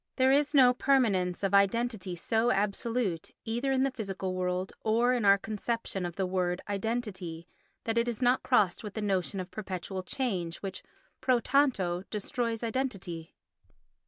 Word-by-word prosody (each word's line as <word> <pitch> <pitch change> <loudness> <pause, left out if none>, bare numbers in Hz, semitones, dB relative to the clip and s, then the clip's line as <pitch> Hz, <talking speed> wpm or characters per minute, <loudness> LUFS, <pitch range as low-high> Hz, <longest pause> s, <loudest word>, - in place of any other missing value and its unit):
There 260 0 +4
is 290 +2 +2
no 255 -3 +7
permanence 205 -10 +2
of 195 - 0
identity 200 -1 +2
so 225 +6 +1
absolute, 205 -2 0 0.2
either 240 +5 -1
in 265 0 +2
the 275 - +1
physical 195 -6 -4
world, 185 0 -2
or 235 +3 +3
in 240 -4 0
our 200 0 +7
conception 215 -2 -3
of 175 - -8
the 190 - 0
word 180 -1 0
"identity," 200 -5 -3 0.4
that 225 0 +1
it 235 - 0
is 235 -3 -2
not 250 +1 +3
crossed 210 -8 +2
with 210 -2 -7
the 220 - -2
notion 195 -1 0
of 185 0 -6
perpetual 190 -2 -5
change 185 -5 -2
which, 190 -1 -4 0.4
pro 255 -2 +3
tanto, 235 -11 +2
destroys 230 +2 -2
identity. 200 -10 -3
210 Hz, 160 wpm, -30 LUFS, 185-245 Hz, 0.4 s, no